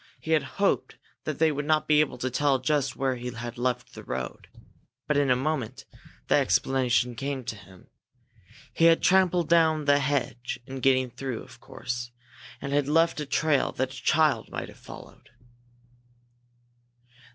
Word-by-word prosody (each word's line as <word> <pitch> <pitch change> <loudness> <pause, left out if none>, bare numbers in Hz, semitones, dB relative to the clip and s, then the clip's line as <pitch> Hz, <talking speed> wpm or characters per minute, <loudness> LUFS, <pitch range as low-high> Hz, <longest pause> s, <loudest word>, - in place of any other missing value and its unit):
He 160 - -5
had 160 -1 +4 0.2
hoped 200 0 0 0.3
that 155 - -3
they 160 -1 +3
would 145 0 -3
not 155 -1 +2
be 150 -1 +5
able 150 -4 +1
to 130 +1 -3
tell 140 +1 +2
just 140 +1 0
where 130 -1 -1
he 125 +1 -5
had 120 +1 -7
left 125 0 -2
the - - -10
road, 65 -1 -5 0.6
but 150 - +1
in 140 -1 +2
a 125 - +5
moment 135 -3 -3 0.4
the - - +2
explanation 125 -2 +1
came 135 +2 -4
to 115 -2 -5
him. 95 -2 -16 0.9
He 165 - +3
had 165 0 +5
trampled 180 -3 +3
down 160 -2 +3
the 145 0 +4
hedge 130 -3 -2
in 135 0 -7
getting 130 -1 +2
through, 125 -1 -5
of - - -15
course, 120 -1 -5 0.5
and 140 - -4
had 145 -1 +2
left 165 +2 +2
a 150 - -4
trail 150 -1 +1
that 130 +1 -2
a 130 - -9
child 155 -2 +2
might - - -5
have - - -15
followed. - - -13
135 Hz, 170 wpm, -27 LUFS, 125-155 Hz, 0.9 s, be